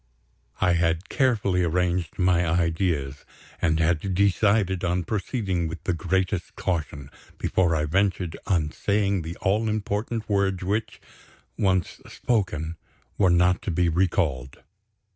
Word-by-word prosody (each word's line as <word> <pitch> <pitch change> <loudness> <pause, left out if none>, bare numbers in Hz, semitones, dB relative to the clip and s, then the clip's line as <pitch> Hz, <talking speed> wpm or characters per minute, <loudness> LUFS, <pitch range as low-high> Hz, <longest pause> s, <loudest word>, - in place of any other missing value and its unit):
I 90 - +3
had 85 +2 0
carefully 105 -9 +1
arranged 85 0 0
my 90 -1 +3
ideas, 80 -4 0 0.4
and 80 -1 +2
had 85 +3 +1
decided 100 -1 +2
on 90 0 0
proceeding 95 -2 -2
with 80 +1 -7
the 90 - 0
greatest 90 +1 -1
caution, 75 -6 -3 0.3
before 85 -3 +1
I 75 -1 0
ventured 90 0 0
on 80 -6 +1
saying 100 -1 0
the 80 +1 -6
all 110 +3 +1
important 110 +1 -2
words 100 -2 0
which, 105 +4 -2 0.6
once 95 -3 0
spoken, 85 -8 -2 0.4
were 95 -3 +5
not 90 +1 +3
to - - -4
be 85 0 +1
recalled. 80 -7 -1
90 Hz, 125 wpm, -25 LUFS, 85-100 Hz, 0.6 s, were